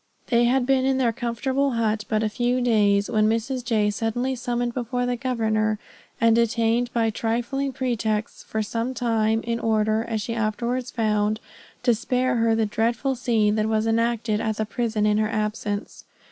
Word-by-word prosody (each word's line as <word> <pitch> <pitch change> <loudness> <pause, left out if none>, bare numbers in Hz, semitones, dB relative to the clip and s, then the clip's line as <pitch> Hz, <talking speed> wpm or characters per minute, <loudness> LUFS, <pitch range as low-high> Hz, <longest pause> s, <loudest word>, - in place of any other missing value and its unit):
They 240 -1 +4
had 250 +1 +2
been 265 0 +2
in 265 0 +2
their 240 -3 +2
comfortable 260 +3 -1
hut 220 -2 0
but 215 0 +1
a - - +2
few 245 +3 0
days, 205 -4 +3
when 215 -2 +2
Mrs. 240 +3 -1
J. 220 -3 +1
was 210 0 0
suddenly 245 +4 -1
summoned 240 -1 -2
before 245 0 -2
the 245 0 0
governor, 220 -4 0 0.4
and 230 -1 +4
detained 235 +1 +1
by 225 -1 +1
trifling 240 +5 -1
pretexts 230 -4 -2
for 220 0 -3
some 230 +4 -3
time, 225 -2 +1
in 230 0 -2
order 220 -1 +1
as 230 -2 -3
she 230 +2 -3
afterwards 235 +3 -1
found 215 -2 0 0.4
to 240 - +4
spare 250 +2 0
her 225 -1 +3
the 225 -1 +2
dreadful 230 +5 0
scene 230 -5 +1
that 215 0 +1
was 220 0 +1
enacted 225 -1 +1
at 220 -1 -1
the 220 - -1
prison 220 -1 -1
in 210 0 +3
her 215 0 +1
absence. 210 -1 -3
230 Hz, 180 wpm, -24 LUFS, 215-245 Hz, 0.4 s, They